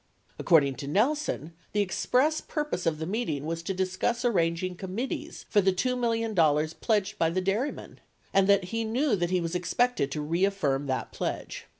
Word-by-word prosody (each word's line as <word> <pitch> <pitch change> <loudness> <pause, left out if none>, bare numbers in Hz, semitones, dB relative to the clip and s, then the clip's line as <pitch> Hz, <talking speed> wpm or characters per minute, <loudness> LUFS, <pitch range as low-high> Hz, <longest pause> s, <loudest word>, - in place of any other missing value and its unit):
According 140 -7 +4
to 140 - -6
Nelson, 210 - 0 0.2
the 205 - +2
express 255 - +1
purpose 300 - -3
of 160 -2 +1
the 160 - -4
meeting 165 - -2
was 165 +1 -3
to 170 - -3
discuss 190 +6 -1
arranging 180 -4 +1
committees 255 - -5
for 205 - +3
the 190 0 +3
$2 250 +8 0
million 230 -2 0 0.5
pledged 210 -2 0
by 165 - +3
the 175 +3 0
dairymen, 200 +10 -2 0.3
and 195 0 +4
that 200 -1 +5
he 230 0 0
knew 240 +3 +1
that, 175 -2 -1
he 185 0 +2
was 165 -1 -3
expected 180 - +1
to 150 - -2
reaffirm 155 -4 0
that 130 -1 -2
pledge. - - -4
190 Hz, 175 wpm, -28 LUFS, 165-235 Hz, 0.5 s, that